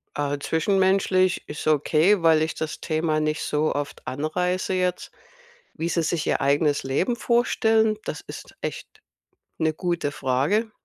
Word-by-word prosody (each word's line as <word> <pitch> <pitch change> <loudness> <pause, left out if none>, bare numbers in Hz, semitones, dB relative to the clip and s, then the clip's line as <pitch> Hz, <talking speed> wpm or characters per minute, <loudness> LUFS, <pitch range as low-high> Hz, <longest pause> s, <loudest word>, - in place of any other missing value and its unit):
Äh, 145 0 -1
zwischenmenschlich 185 +3 +1
ist 150 - -6
okay, 155 +6 +3
weil 160 -1 +4
ich 160 - -2
das 155 -1 -5
Thema 155 -1 0
nicht 155 0 -1
so 150 +1 0
oft 145 0 -5
anreiße 180 +7 -1
jetzt. 180 -1 -1 0.6
Wie 165 - -3
sie 170 -1 0
sich 160 -1 -1
ihr - - +1
eigenes 145 +1 +2
Leben 145 - 0
vorstellen, 225 -2 +2
das - - -5
ist - - -11
echt - - -5 0.7
'ne 160 -1 +1
gute 170 -4 -2
Frage. 140 - 0
160 Hz, 145 wpm, -24 LUFS, 150-185 Hz, 0.7 s, weil